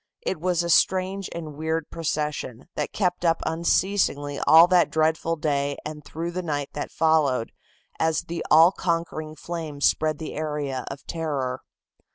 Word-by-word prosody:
It 185 Hz, -, -3 dB
was 175 Hz, -1 st, +1 dB
a 170 Hz, -, -3 dB
strange 190 Hz, +3 st, +2 dB
and 160 Hz, -3 st, -6 dB
weird 160 Hz, +1 st, -3 dB
procession, 150 Hz, -6 st, -3 dB
that -, -, -3 dB
kept 180 Hz, -3 st, -1 dB
up 165 Hz, -1 st, +3 dB
unceasingly 165 Hz, -3 st, 0 dB
all 165 Hz, +2 st, +9 dB
that 180 Hz, -1 st, +3 dB
dreadful 160 Hz, +1 st, +1 dB
day 145 Hz, -2 st, -1 dB
and 150 Hz, 0 st, -6 dB
through 165 Hz, +4 st, -5 dB
the 185 Hz, +1 st, -3 dB
night 145 Hz, -5 st, -3 dB
that 145 Hz, -, -4 dB
followed, 150 Hz, -7 st, +2 dB, 0.5 s
as 160 Hz, -1 st, +1 dB
the 170 Hz, 0 st, -5 dB
all 165 Hz, +3 st, +7 dB
conquering 165 Hz, -4 st, -2 dB
flames 155 Hz, -4 st, -4 dB
spread 155 Hz, -1 st, +2 dB
the 155 Hz, -, -6 dB
area 150 Hz, -4 st, -3 dB
of 135 Hz, 0 st, -8 dB
terror. 140 Hz, -6 st, -3 dB
160 Hz, 155 wpm, -25 LUFS, 145-170 Hz, 0.5 s, all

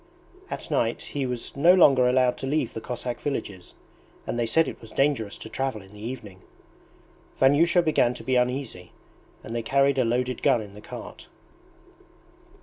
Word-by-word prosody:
At -, -, -6 dB
night -, -, +1 dB
he 140 Hz, -2 st, -3 dB
was 125 Hz, -2 st, -5 dB
no 170 Hz, +6 st, +6 dB
longer 135 Hz, -8 st, +6 dB
allowed 125 Hz, -1 st, +3 dB
to 135 Hz, -, -4 dB
leave 145 Hz, -3 st, -1 dB
the 115 Hz, -, -6 dB
Cossack 120 Hz, 0 st, -5 dB
villages, 100 Hz, -10 st, -5 dB, 0.5 s
and 120 Hz, -, -3 dB
they 115 Hz, -, 0 dB
said 160 Hz, +6 st, +3 dB
it -, -, -7 dB
was 115 Hz, -, -12 dB
dangerous 135 Hz, -8 st, 0 dB
to -, -, -9 dB
travel 130 Hz, -3 st, -3 dB
in 95 Hz, +1 st, -17 dB
the 105 Hz, -, -13 dB
evening. 110 Hz, -5 st, -7 dB, 1.0 s
Vanyusha 165 Hz, +6 st, +4 dB
began 125 Hz, -6 st, +2 dB
to -, -, -9 dB
be 130 Hz, -, 0 dB
uneasy, 125 Hz, -7 st, -2 dB, 0.5 s
and 115 Hz, -, -6 dB
they 120 Hz, -, -1 dB
carried 135 Hz, +3 st, +2 dB
a -, -, +4 dB
loaded 125 Hz, +1 st, -1 dB
gun 120 Hz, -, +3 dB
in 105 Hz, -2 st, -9 dB
the 105 Hz, -, -12 dB
cart. -, -, -10 dB
125 Hz, 175 wpm, -25 LUFS, 115-140 Hz, 1.0 s, no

